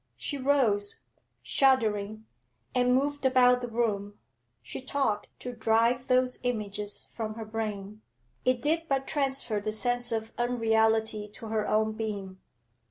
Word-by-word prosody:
She 285 - -3
rose, 240 -7 +2 0.4
shuddering, 220 -5 +2 0.5
and 250 0 +3
moved 285 +2 0
about 250 -1 +5
the 245 - -3
room; 210 -3 -1 0.5
she - - -6
talked 260 -6 -1
to 250 - -5
drive 230 +2 +2
those 255 0 +2
images 210 -4 -3
from 215 -2 -4
her 225 -1 -6
brain. 215 -1 -5 0.4
It 255 -1 +1
did 325 +2 +1
but 270 -1 +1
transfer 265 -7 0
the 215 +1 -2
sense 245 +2 +1
of 225 0 -3
unreality 220 -3 +2
to 225 -1 -9
her 215 -1 0
own 220 0 +2
being. 205 -4 -5
225 Hz, 135 wpm, -29 LUFS, 215-255 Hz, 0.5 s, about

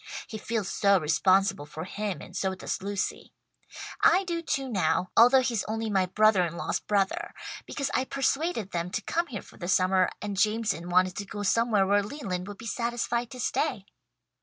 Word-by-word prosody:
He 220 - -7
feels 220 -2 -2
so 200 0 +3
responsible 185 0 +2
for 155 +2 -7
him 200 +1 -4
and 180 - -12
so 190 -1 -1
does - - -4
Lucy. 200 0 -3 0.7
I 365 +3 +6
do 340 -2 -3
too, 275 -5 -2
now, 185 -5 0
although 250 +3 +7
he's 235 -4 0
only 220 0 -3
my 190 -2 +2
brother 215 0 +4
in 170 -1 -3
law's - - -1
brother, 200 -2 -1 0.3
because 280 -2 -3
I 260 - +1
persuaded 275 - -1
them 170 0 -2
to 220 - -2
come 340 - -1
here 220 -9 -6
for - - -17
the 175 - -6
summer, 185 0 +3
and 205 -1 -4
Jameson 210 -6 0
wanted 185 +1 +3
to 200 - -3
go 205 +1 -6
somewhere 215 -1 +3
where 205 +1 +3
Leland 200 -6 -5
would 205 -1 -8
be 230 - -10
satisfied 235 0 -2
to 255 - -10
stay." 240 -5 -1
205 Hz, 185 wpm, -28 LUFS, 185-235 Hz, 0.7 s, although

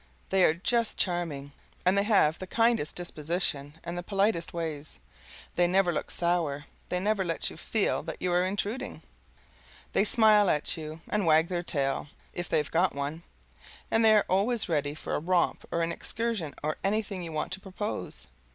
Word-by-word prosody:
They 190 -1 +4
are 155 - +3
just 230 +6 0
charming, 165 -6 -1 0.3
and 185 +2 +4
they 200 - +4
have 195 -8 +3
the 185 - -6
kindest 230 -7 +2
disposition 155 -4 -2
and 170 - -5
the 175 - -2
politest 195 -1 0
ways; 155 -3 -4 0.6
they 175 0 +4
never 185 0 +3
look - - -3
sour, 165 -5 0 0.2
they 180 - 0
never 205 +1 +1
let 165 -2 -1
you - - -10
feel 220 -3 0
that - - -7
you 180 -1 0
are 180 +1 +3
intruding, 205 +5 -3 0.9
they - - +4
smile 215 -2 +5
at 150 +2 +1
you 155 -1 -7
and 210 -4 0
wag 160 +1 +5
their 175 -2 -1
tail, 140 -5 -1 0.3
if 175 0 -4
they've 150 -2 +1
got 175 0 +2
one, 145 +3 -3 0.7
and 225 - +4
they 220 -1 +7
are 210 - +4
always 215 +5 +1
ready 145 -3 0
for - - -5
a - - +1
romp 175 +2 +1
or 170 - +1
an 165 - 0
excursion 220 - -3
or 155 +1 -1
anything 200 -1 -1
you 170 -2 -6
want 155 +3 -3
to 190 - -4
propose. 190 - -5
175 Hz, 180 wpm, -29 LUFS, 155-200 Hz, 0.9 s, they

